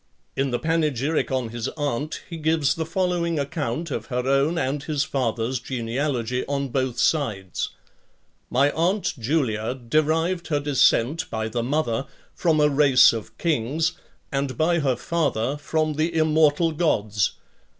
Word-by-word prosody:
In 135 Hz, 0 st, 0 dB
the 120 Hz, -, 0 dB
panegyric 155 Hz, -2 st, 0 dB
on 130 Hz, -3 st, -1 dB
his 120 Hz, 0 st, -4 dB
aunt, 145 Hz, 0 st, -2 dB
he 170 Hz, -, -7 dB
gives 155 Hz, -3 st, +2 dB
the 160 Hz, -1 st, -4 dB
following 175 Hz, -1 st, 0 dB
account 155 Hz, +2 st, -3 dB
of -, -, -4 dB
her 125 Hz, 0 st, -2 dB
own 140 Hz, +5 st, +2 dB
and 140 Hz, -2 st, -1 dB
his 145 Hz, -1 st, -1 dB
father's 125 Hz, -2 st, -1 dB
genealogy, 125 Hz, 0 st, -2 dB
on 140 Hz, -1 st, -2 dB
both 130 Hz, -1 st, -1 dB
sides: 105 Hz, -, 0 dB, 0.8 s
"My 140 Hz, +3 st, +3 dB
aunt 185 Hz, +6 st, 0 dB
Julia 115 Hz, -3 st, 0 dB
derived 155 Hz, +7 st, 0 dB
her 150 Hz, -3 st, +1 dB
descent, 145 Hz, 0 st, +2 dB
by 110 Hz, 0 st, -2 dB
the 120 Hz, +2 st, -2 dB
mother, 135 Hz, -1 st, -1 dB, 0.3 s
from 160 Hz, -3 st, +1 dB
a 150 Hz, -, +5 dB
race 140 Hz, -4 st, +6 dB
of 115 Hz, -2 st, -7 dB
kings, 155 Hz, 0 st, 0 dB, 0.4 s
and 135 Hz, -1 st, -2 dB
by 170 Hz, +2 st, +2 dB
her 135 Hz, -4 st, +1 dB
father, 145 Hz, -7 st, -1 dB
from 155 Hz, +1 st, -1 dB
the 155 Hz, +3 st, 0 dB
Immortal 155 Hz, 0 st, +3 dB
Gods. 110 Hz, -, +1 dB
145 Hz, 145 wpm, -24 LUFS, 125-160 Hz, 0.8 s, race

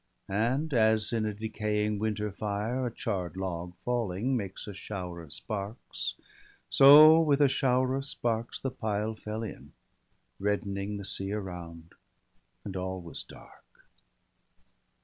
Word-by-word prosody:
And 125 Hz, +10 st, 0 dB
as, 110 Hz, -2 st, +3 dB
in 110 Hz, -2 st, +1 dB
a 105 Hz, -, -2 dB
decaying 105 Hz, -1 st, -1 dB
winter 105 Hz, -1 st, -1 dB
fire, 105 Hz, +5 st, -2 dB
A -, -, -4 dB
charr'd 95 Hz, -, -3 dB
log, 90 Hz, -2 st, -4 dB
falling, 120 Hz, 0 st, 0 dB
makes 100 Hz, -5 st, -4 dB
a 105 Hz, -, -6 dB
shower 90 Hz, -3 st, -6 dB
of 80 Hz, -4 st, -13 dB
sparks 100 Hz, -, -5 dB, 0.3 s
— -, -, -29 dB
So 150 Hz, +4 st, +9 dB
with 150 Hz, -3 st, +3 dB
a 145 Hz, -, +6 dB
shower 130 Hz, -1 st, +2 dB
of 135 Hz, +1 st, -1 dB
sparks 115 Hz, -3 st, -2 dB
the 135 Hz, -, -3 dB
pile 110 Hz, -2 st, -2 dB
fell 110 Hz, +1 st, -5 dB
in. 110 Hz, -, -8 dB, 0.7 s
Reddening 100 Hz, 0 st, -1 dB
the 100 Hz, -, -6 dB
sea 95 Hz, 0 st, -1 dB
around; 85 Hz, -5 st, -7 dB, 0.7 s
and 100 Hz, -2 st, -6 dB
all 95 Hz, 0 st, -3 dB
was 85 Hz, -3 st, -7 dB
dark. -, -, -17 dB
105 Hz, 140 wpm, -29 LUFS, 95-120 Hz, 0.7 s, So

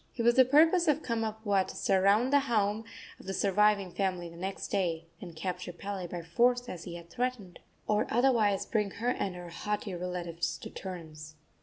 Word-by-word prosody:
It 235 Hz, -, 0 dB
was 240 Hz, +1 st, +5 dB
the 260 Hz, +1 st, +6 dB
purpose 325 Hz, +6 st, +5 dB
of 300 Hz, 0 st, +2 dB
Kamapuaa 220 Hz, -4 st, 0 dB
to -, -, -8 dB
surround 200 Hz, +7 st, +3 dB
the 285 Hz, -, +7 dB
home 220 Hz, -4 st, 0 dB, 0.3 s
of -, -, -14 dB
the 195 Hz, -, -2 dB
surviving 200 Hz, -1 st, +3 dB
family 185 Hz, -2 st, -2 dB
the 165 Hz, -, -13 dB
next 190 Hz, +3 st, -5 dB
day, 170 Hz, -4 st, -1 dB, 0.2 s
and 175 Hz, -4 st, -9 dB
capture 180 Hz, +2 st, -4 dB
Pele 190 Hz, +1 st, -5 dB
by 175 Hz, 0 st, -6 dB
force, 245 Hz, +8 st, +2 dB
as 175 Hz, -6 st, -7 dB
he 170 Hz, -, -6 dB
had 170 Hz, 0 st, -11 dB
threatened, 240 Hz, -6 st, -3 dB, 0.3 s
or 210 Hz, 0 st, +1 dB
otherwise 230 Hz, -5 st, +3 dB
bring 210 Hz, -3 st, 0 dB
her 235 Hz, +3 st, 0 dB
and 195 Hz, -7 st, -1 dB
her 175 Hz, -1 st, -8 dB
haughty 205 Hz, +3 st, -3 dB
relatives 175 Hz, -1 st, -3 dB
to -, -, -9 dB
terms. 155 Hz, -5 st, -8 dB
200 Hz, 185 wpm, -30 LUFS, 175-230 Hz, 0.3 s, the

